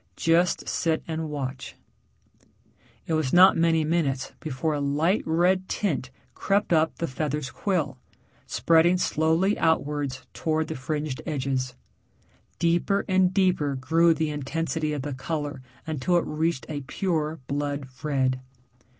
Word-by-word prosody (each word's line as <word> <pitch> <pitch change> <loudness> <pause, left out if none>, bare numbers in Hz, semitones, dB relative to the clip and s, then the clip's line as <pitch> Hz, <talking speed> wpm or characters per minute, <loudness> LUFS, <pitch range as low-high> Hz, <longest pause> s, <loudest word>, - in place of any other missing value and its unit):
"Just 170 +2 +2
sit 160 -2 0
and 160 -1 -3
watch." 135 -3 -5 1.3
It 165 - -2
was 155 -5 +1
not 185 +2 +7
many 165 -1 +3
minutes 150 -5 0
before 155 +1 -2
a 145 - -1
light 150 +8 +1
red 180 +3 +2
tint 155 -10 -1 0.2
crept 200 -2 +1
up 160 0 +3
the 170 - -2
feather's 145 -1 -3
quill, 155 -10 -1 0.5
spreading 170 +2 +4
slowly 165 +4 +1
outwards 145 -5 0
towards 160 -1 -1
the - - -3
fringed 145 +1 -3
edges. 130 -4 -2 0.8
Deeper 175 +4 +1
and 185 -2 +3
deeper 180 -7 +2
grew 165 +6 +3
the 155 0 -1
intensity 155 +2 -2
of 145 -3 -3
the 145 -1 -4
color 145 +1 -4 0.2
until 160 +3 +1
it 170 - 0
reached 160 -2 -1
a 145 -2 -4
pure 160 +1 -2
blood 145 0 -3
red. 130 -4 0
155 Hz, 135 wpm, -26 LUFS, 140-170 Hz, 1.3 s, not